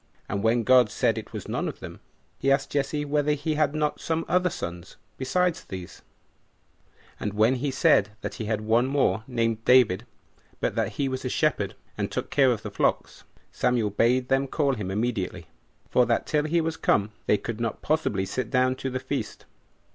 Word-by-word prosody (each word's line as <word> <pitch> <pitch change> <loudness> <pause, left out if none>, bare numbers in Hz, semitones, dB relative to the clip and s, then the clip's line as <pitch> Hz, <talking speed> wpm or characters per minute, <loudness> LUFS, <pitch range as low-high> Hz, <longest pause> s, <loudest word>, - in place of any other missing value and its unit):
And 100 0 -2
when 115 +2 +2
God 125 -2 +5
said 110 +1 +1
it 110 - -11
was - - -7
none - - -2
of - - -6
them, - - -9 0.4
he 135 - +2
asked 135 0 +1
Jesse 145 +1 -1
whether 150 0 +1
he 150 +2 -2
had 150 -1 +1
not 150 -1 -1
some 165 0 -1
other 180 +1 +2
sons 85 - -7 0.2
besides 175 +6 0
these; 90 -2 -9 1.2
and 105 - -3
when 110 +4 +4
he 140 +3 -1
said 105 -5 +3
that - - -4
he - - -3
had 110 0 -1
one 115 +4 +2
more, 130 -7 +1
named 115 -3 -1
David, 120 -4 +4 0.5
but - - 0
that 110 -2 -1
he 140 +5 -1
was 130 0 -3
a 130 - -2
shepherd, 125 -10 0 0.2
and - - -2
took - - -4
care 135 -3 +4
of 115 - -2
the - - -5
flocks, - - -1 0.3
Samuel 120 -4 +1
bade 125 +4 +2
them 135 +1 +1
call 140 0 +1
him 105 -6 -4
immediately, 100 -5 -2 0.5
for 125 -2 +4
that 115 - +1
till 150 -1 0
he 165 +2 +2
was 160 0 -2
come 105 +1 +1 0.2
they 105 - +4
could 115 +1 -5
not 115 -1 -3
possibly 145 -11 0
sit 115 +4 -3
down 130 0 +2
to 135 - -3
the 130 0 -3
feast. 130 +2 -5
125 Hz, 195 wpm, -26 LUFS, 110-145 Hz, 1.2 s, God